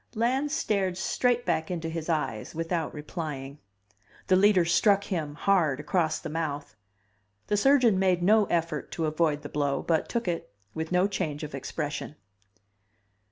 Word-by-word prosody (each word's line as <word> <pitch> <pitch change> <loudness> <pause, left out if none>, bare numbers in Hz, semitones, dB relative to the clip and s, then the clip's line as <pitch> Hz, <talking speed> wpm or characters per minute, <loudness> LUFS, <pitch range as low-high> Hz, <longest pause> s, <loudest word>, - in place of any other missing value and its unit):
Lans 260 +6 +1
stared 195 -10 0
straight 245 +5 +1
back 160 - 0
into 170 -3 -3
his 165 0 -5
eyes 150 -9 -2
without 165 -1 -2
replying. 150 -3 -6 0.7
The 185 - +6
Leader 190 -2 +5
struck 200 +4 +3
him, 155 -6 -3
hard, 160 -7 +2
across 155 +1 0
the - - -7
mouth. 150 -5 -4 0.7
The 210 - 0
surgeon 240 -3 +4
made 185 -2 +2
no 210 +3 +5
effort 170 -2 -2
to 165 - -1
avoid 155 -1 0
the - - -5
blow, 140 -2 -1
but 160 -2 0
took 235 -4 -2
it, 170 - -3 0.2
with 160 +1 -4
no 180 +1 +3
change 165 -7 -3
of 150 - -6
expression. 145 +2 -4
165 Hz, 155 wpm, -27 LUFS, 150-195 Hz, 0.7 s, The